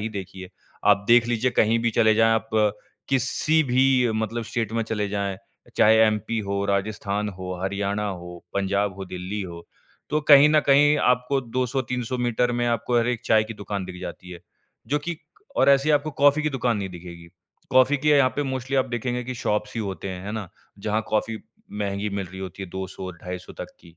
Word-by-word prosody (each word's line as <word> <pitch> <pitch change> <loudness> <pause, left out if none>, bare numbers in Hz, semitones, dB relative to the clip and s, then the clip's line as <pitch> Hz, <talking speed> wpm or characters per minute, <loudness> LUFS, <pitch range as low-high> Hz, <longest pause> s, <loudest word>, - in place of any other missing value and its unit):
ही 110 - -2
देखी 95 0 -11
है, 95 - -9 0.4
आप 100 0 +4
देख 120 0 +6
लीजिए 120 +1 +1
कहीं 110 +2 +3
भी 115 0 +1
चले 110 -1 +3
जाएँ 115 +1 +4
आप 110 0 -2 0.6
किसी 135 +4 +2
भी 130 -2 +3
मतलब 110 +2 -2
स्टेट 115 -1 -3
में 115 0 0
चले 105 -2 -2
जाएँ 100 -1 -2 0.4
चाहे 110 - +6
एमपी 110 +1 -1
हो, 100 -1 -2
राजस्थान 100 +1 -1
हो, 95 -2 -6
हरियाणा 100 +1 -1
हो, 90 -2 -7 0.2
पंजाब 100 0 0
हो, 95 - -6
दिल्ली 90 +3 -5
हो। 85 -2 -8 0.5
तो 150 - +1
कहीं 145 +1 +9
न 155 0 +4
कहीं 145 +2 +5 0.2
आपको 125 +3 -1
200-300 125 0 -2
मीटर 120 0 +1
में 120 - +1
आपको 120 +1 +1
हर 115 - +1
एक 120 -2 -1
चाय 110 -1 +4
की 115 +1 -8
दुकान 100 -2 -5
दिख 90 0 -9
जाती 90 +1 -8
है। 85 -1 -9 0.5
जो 150 - +1
कि 165 +3 -5 0.4
और - - +4
ऐसी 140 +2 +4
आपको 150 +1 +2
कॉफ़ी 145 +1 +5
की 155 - 0
दुकान 120 -2 +1
नहीं 100 -1 -3
दिखेगी। 85 -1 -11 0.4
कॉफ़ी 130 +2 +5
की 150 +3 -1
य - - +6
यहाँ 140 -2 +5
पे 145 - +1
मोस्टली 130 -1 -3
आप 130 - +2
देखेंगे 125 +1 -2
कि 130 +1 -5
शॉप्स 105 -3 -2
ही 115 - -2
होते 100 -2 -5
हैं, 90 0 -6
है 105 - -4
ना? 110 -4 -5 0.3
जहाँ 105 +2 -1
कॉफ़ी 110 +1 -1 0.3
महँगी 100 0 -2
मिल 100 -1 -3
रही 95 +2 -10
होती 95 +1 -7
है 95 - -7
200-250 90 -1 -7
तक - - -9
की। 85 -1 -18
110 Hz, 205 wpm, -24 LUFS, 100-125 Hz, 0.6 s, कहीं